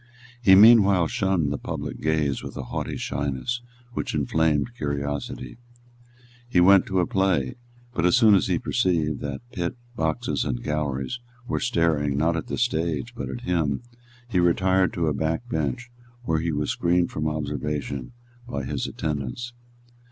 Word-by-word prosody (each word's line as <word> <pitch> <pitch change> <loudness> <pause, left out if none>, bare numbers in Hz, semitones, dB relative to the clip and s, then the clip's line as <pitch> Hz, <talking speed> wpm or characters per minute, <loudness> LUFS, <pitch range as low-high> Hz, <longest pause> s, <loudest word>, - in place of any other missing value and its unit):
He 95 -5 +7
meanwhile 100 -4 +7
shunned 90 -6 0
the 70 - -4
public - - -5
gaze 80 -3 0
with - - -8
a 65 - -4
haughty - - -4
shyness 70 - -2 0.3
which - - -3
inflamed 80 +6 +1
curiosity. 70 - -4 0.9
He 90 - +3
went 95 +2 +6
to 95 -1 +1
a - - +2
play; 95 -10 +1 0.4
but, 85 - -1
as 90 +6 +5
soon 110 -4 +6
as 95 - +4
he 90 -3 +1
perceived 80 - 0
that 70 - -5
pit, 85 +1 -3 0.2
boxes 80 -6 -1
and - - -3
galleries 75 - -2 0.3
were - - -1
staring, 80 - +1
not 80 +3 +2
at 80 - -3
the - - -3
stage, 85 -2 -1
but 120 - -5
at 120 - -5
him, 85 - 0 0.4
he 100 -7 +1
retired 95 +2 +3
to 85 - 0
a 75 - +1
back 80 - -2
bench 120 - -2 0.3
where 80 -8 +1
he 85 +1 -1
was 75 -1 -1
screened 85 0 +1
from 75 0 -2
observation 75 -3 -3 0.4
by 70 - -3
his - - -3
attendants. 75 - -4
80 Hz, 160 wpm, -25 LUFS, 75-95 Hz, 0.9 s, He